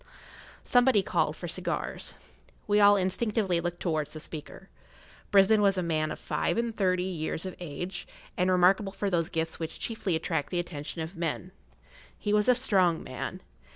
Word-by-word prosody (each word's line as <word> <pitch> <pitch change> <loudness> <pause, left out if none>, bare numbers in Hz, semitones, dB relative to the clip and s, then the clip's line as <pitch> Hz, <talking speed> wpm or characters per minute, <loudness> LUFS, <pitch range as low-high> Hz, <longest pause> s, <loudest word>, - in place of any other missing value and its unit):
Somebody 245 -4 +4
called - - 0
for - - -6
cigars. - - -3 0.5
We 205 0 +3
all 205 0 +7
instinctively 190 -1 +1
looked 175 0 -3
towards 155 -4 -1
the 155 - -6
speaker. 155 +5 -8 0.6
Brisbane 205 +1 +5
was 195 -1 +3
a 185 - 0
man 155 -2 0
of - - -5
five - - -1
and 235 -1 -1
thirty 185 -3 +1
years 165 -2 -3
of 185 - -5
age, 175 +2 -5 0.3
and 180 +1 +1
remarkable 190 +2 +4
for 200 0 -2
those 165 -2 +1
gifts 160 0 -2
which 160 -1 -5
chiefly 215 -6 -1
attract 160 -2 -1
the 175 - -1
attention 165 -1 -5
of 160 +4 -6
men. 170 +2 -3 0.7
He 210 - -1
was 210 +3 +3
a 250 - +6
strong 190 -9 +2
man. - - -6
185 Hz, 170 wpm, -28 LUFS, 165-205 Hz, 0.7 s, all